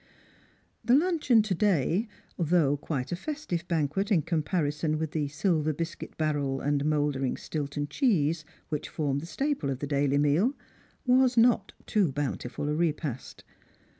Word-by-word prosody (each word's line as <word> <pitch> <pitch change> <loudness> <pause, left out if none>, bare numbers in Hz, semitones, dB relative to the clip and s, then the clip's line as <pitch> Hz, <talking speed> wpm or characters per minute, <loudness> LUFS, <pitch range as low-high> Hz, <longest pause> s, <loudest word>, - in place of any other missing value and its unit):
The 245 - +4
luncheon 300 -8 +3
to 210 -2 -1
day, 185 - +1 0.3
though 165 -4 +2
quite 140 -3 -4
a - - 0
festive 185 - -4
banquet 170 +5 0
in 170 -7 +4
comparison 155 -1 0
with 160 -1 -3
the 150 -3 -1
silver 155 +1 0
biscuit 165 +3 -6
barrel 145 -4 0
and 145 0 0
mouldering 145 -3 0
Stilton 145 -1 -3
cheese 165 - +1 0.3
which 150 -2 -3
formed 140 -2 -1
the 165 - -8
staple 275 - -1
of 135 - -1
the 145 - -4
daily 140 -1 +1
meal, 155 - +2 0.5
was 255 -1 +4
not 230 -4 +4
too 195 -8 +2
bountiful 135 -1 -3
a 150 - 0
repast. 150 -5 -2
155 Hz, 145 wpm, -28 LUFS, 145-195 Hz, 0.5 s, The